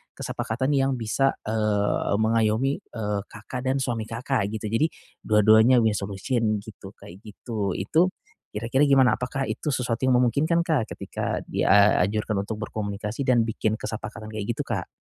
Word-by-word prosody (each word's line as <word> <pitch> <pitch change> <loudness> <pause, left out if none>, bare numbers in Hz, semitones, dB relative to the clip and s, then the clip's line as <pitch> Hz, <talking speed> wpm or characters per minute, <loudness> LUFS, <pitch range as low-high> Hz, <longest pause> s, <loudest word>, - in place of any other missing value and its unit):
kesepakatan 130 +5 -2
yang 135 -1 +2
bisa, 125 +4 0
eee, 105 -2 0
mengayomi, 115 +4 +1
eee, 105 -2 -4
Kakak 125 +5 -8
dan 130 - +2
suami 115 -4 -2
Kakak 115 0 -1
gitu. 110 -1 -4
Jadi 115 +8 +2 0.4
dua-duanya 110 +3 +5
win 110 - +3
solution 105 +2 -1
gitu, 100 -2 -11
kayak 90 +3 -13
gitu. 105 -2 -4
Itu, 160 - +2 0.5
kira-kira 120 +7 +1
gimana? 135 -2 +4
Apakah 130 +2 -2
itu - - -5
sesuatu 125 -1 -2
yang 130 - +4
memungkinkan 155 +7 +2
Kak 150 -9 0
ketika - - -4
dianjurkan 105 +1 +3
untuk 110 - -3
berkomunikasi 105 +4 -4
dan 120 -2 +4
bikin 110 -1 -1
kesepakatan 110 0 -6
kayak 110 -2 -5
gitu - - -3
Kak? - - -3
110 Hz, 150 wpm, -25 LUFS, 105-130 Hz, 0.5 s, dua-duanya